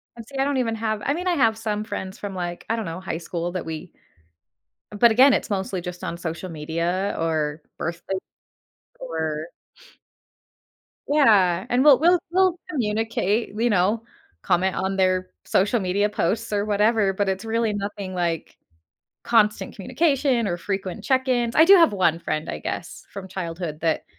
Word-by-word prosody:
And 230 -1 -10
see, 275 - -8
I 270 - +2
don't 280 -1 0
even 230 -3 0
have 220 -1 -2
I 280 - +2
mean, 355 +4 -3
I 360 - +3
have 225 -6 +3
some 215 -1 -2
friends 190 -2 -6
from 200 -2 -6
like, 175 -1 -5
I 225 - +2
don't 225 -2 -3
know, 165 +1 -5
high 185 -3 -4
school 170 +1 -4
that 185 - -4
we 160 +2 -6 1.0
But 210 +3 +5
again, 260 +5 +6
it's - - -1
mostly 190 -2 -2
just 180 0 -7
on 170 - -4
social 170 +2 -5
media 170 +5 -2
or 155 -2 -1 0.2
birthday 170 +3 -3 0.8
or 160 -2 -3 1.6
Yeah, 205 - +4
and 250 +2 +3
we'll 290 -3 +7
we'll 350 +3 +5
we'll 370 -1 +3
communicate, 225 - -1
you 240 +1 +2
know, 205 +3 +2 0.4
comment 185 +2 +1
on 190 +1 -1
their 185 -1 +1 0.2
social 205 +5 +2
media 200 +2 +1
posts 210 +2 -1
or 205 0 +1
whatever, 210 -1 +2
but 200 +1 -1
it's 190 +1 -1
really 225 -1 0
nothing, 200 -1 -5
like, 170 -3 -2 0.7
constant 215 -2 +2
communication 265 - +1
or 175 - -1
frequent 195 0 -4
check-ins. 255 -3 +1
I 320 - +7
do 395 +3 +9
have 335 -3 +6
1 170 -4 +2
friend, 155 -2 -3
I 75 - -4
guess, - - -6
from 195 -2 -7
childhood 170 -4 -5
that 160 -1 0
200 Hz, 170 wpm, -23 LUFS, 175-230 Hz, 1.6 s, do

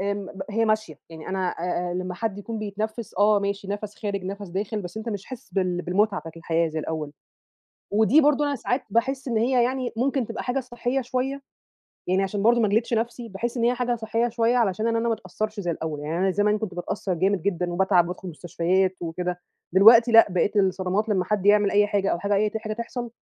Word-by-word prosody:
آمم 200 0 -2
ب 190 0 -7
هي 225 +2 +1
ماشية، 215 -9 -1
يعني 160 -1 -9
أنا 190 -1 -1
آآ 175 +1 -2
آآ - - -3
لمّا 180 0 -3
حد 205 0 -3
يكون 225 +2 -5
بيتنفّس 215 +2 -4
آه 210 0 +5
ماشي 200 0 -3
نَفْس 205 +1 -4
خارج، 200 -3 -3
نَفْس 200 0 -6
داخل، 205 +4 -3
بس 180 +3 -8
أنت 220 +2 -5
مش 205 -3 -4
حاسس 255 -1 -10
بال 180 -2 0
بالمتعة 195 +2 +1
بتاعة 165 - -9
الحياة 165 0 0
زي 155 0 -4
الأوّل. 155 -2 -4 0.8
ودي 220 +8 +5
برضه 295 0 +3
أنا 285 - 0
ساعات 250 +3 -1
باحِس 265 +5 0
إن 230 - -1
هي 245 +2 +3
يعني 255 0 -2
ممكن 265 0 0
تبقى 230 0 -5
حاجة 255 +2 -1
صحّية 245 +1 -2
شويّة، 260 +2 -3 0.7
يعني 185 +2 +2
عشان 200 +1 -2
برضه 235 +1 +5
ما 215 - +3
أجلدِش 225 +4 +1
نَفْسي 230 +1 -2
باحس 235 +6 -4
إن 235 - 0
هي 240 +1 +4
حاجة 245 -1 0
صحيّة 230 +1 -1
شويّة 235 +1 +1
علشان 215 -1 +1
أنا 230 0 +1
ما 235 - -1
ما - - +2
أتأثّرش 215 +3 -5
زي 175 -3 -1
الأوّل. 155 -2 -4
يعني 155 +3 -3
أنا 190 +1 +2
زمان 210 +2 +2
كُنت 210 -4 -5
بتأثّر 185 +2 -3
جامد 190 +1 +1
جدًا، 180 -2 -1
وباتعب، 185 -1 +3
وبادخل 180 +1 -6
مستشفيات 180 +3 0
وكده، 175 +1 -3 0.3
دلوقتي 230 +5 +7
لأ 225 0 +8
بقيت 185 +3 0
الصدمات 190 +2 +1
لمّا 185 -3 +1
حد 200 0 -1
يعمل 205 0 +5
أي 205 0 +4
حاجة، 200 -1 0
أو - - -1
حاجة 200 +1 0
أي 210 +1 +2
ت 220 - -3
حاجة 215 0 -4
تحصل، 235 +1 -5
205 Hz, 220 wpm, -25 LUFS, 185-230 Hz, 0.8 s, لأ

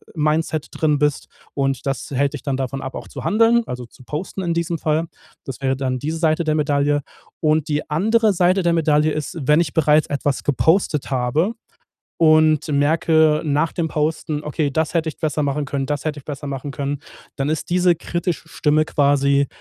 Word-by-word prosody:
Mindset 155 0 0
drin 150 -3 +1
bist 150 -1 0 0.3
und 135 -2 -1
das 135 -2 -3
hält 140 +2 0
dich 145 - -7
dann 135 -2 -1
davon 135 0 -3
ab, 135 - -6
auch - - -7
zu - - -8
handeln, 230 +2 +4
also 125 -1 -5
zu 125 - -18
posten 155 +9 -5
in 170 - 0
diesem 170 0 -1
Fall. 160 +1 0 0.4
Das 135 0 -7
wäre 130 -1 0
dann 130 -1 -1
diese 155 +4 -3
Seite 160 0 +1
der 155 0 +1
Medaille. 145 -1 +1 0.4
Und 155 0 +1
die 150 +1 -2
andere 215 +7 +2
Seite 185 +1 +2
der 170 -1 +2
Medaille 155 -1 +2
ist, 155 +4 -4
wenn 150 +5 +4
ich 150 -5 -3
bereits 155 -1 +3
etwas 145 -1 -1
gepostet 150 - +1
habe 135 - +1 0.6
und 155 -1 +4
merke 155 +1 +3
nach 150 +2 +1
dem 165 -2 -1
Posten: 155 0 -2
„Okay, 150 0 -1
das 160 +3 -1
hätte 165 -1 +1
ich 155 - -10
besser 155 -1 -1
machen 145 +1 -1
können, 135 0 -2
das 150 +1 -3
hätte 150 -1 -2
ich 135 - -18
besser 145 -1 -6
machen 140 0 -5
können,“ 140 0 -3 0.4
dann 140 +2 -1
ist 155 - -3
diese 180 -1 +4
kritische 170 +1 -3
Stimme 155 0 +1
quasi 140 -2 +2
150 Hz, 195 wpm, -21 LUFS, 140-160 Hz, 0.6 s, handeln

